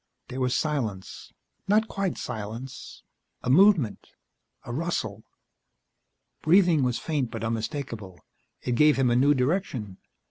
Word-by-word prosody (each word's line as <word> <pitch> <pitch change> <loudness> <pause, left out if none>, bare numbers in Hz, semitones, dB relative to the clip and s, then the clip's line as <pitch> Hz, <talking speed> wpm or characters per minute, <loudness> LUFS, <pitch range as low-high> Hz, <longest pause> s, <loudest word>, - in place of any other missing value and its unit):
There 130 +1 -5
was 125 -1 +1
silence... 120 -11 -3 0.4
not 215 +3 +3
quite 195 -4 -2
silence... 115 +3 -7 0.4
a 125 - +1
movement... 165 - +4 0.6
a 120 - -5
rustle 115 - -3 1.2
Breathing 175 -2 +4
was 125 -2 +1
faint 145 -7 -2
but 115 -1 -6
unmistakable. 115 - -4 0.4
It - - -2
gave 150 +4 +4
him 130 -2 +3
a - - +3
new 140 +4 +4
direction. 125 - -1
130 Hz, 120 wpm, -26 LUFS, 115-155 Hz, 1.2 s, movement